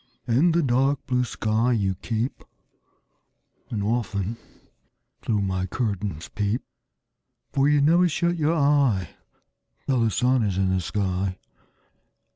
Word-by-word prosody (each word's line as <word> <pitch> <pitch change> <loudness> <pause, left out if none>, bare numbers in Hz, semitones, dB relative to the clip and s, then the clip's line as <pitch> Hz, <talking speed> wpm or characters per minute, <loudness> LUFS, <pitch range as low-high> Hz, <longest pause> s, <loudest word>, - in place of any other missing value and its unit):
In 135 +9 +3
the 170 0 +2
dark 135 +2 +1
blue 125 0 +1
sky 115 +1 0
you 100 -4 +1
keep, 115 +6 -3 1.3
And 105 -3 -2
often 105 -2 -1 0.9
through 105 -3 0
my 95 -1 -1
curtains 100 - -3
peep; 105 +4 -2 0.9
For 140 +1 +3
you 150 -1 +4
never 170 +5 +4
shut 170 +3 0
your 160 0 +1
eye 140 - +2 0.7
Till 130 -3 +1
the 115 - +3
sun 125 +6 +2
is 100 -4 0
in 95 -1 +1
the 95 - +1
sky. 95 -1 -2
115 Hz, 125 wpm, -24 LUFS, 100-140 Hz, 1.3 s, you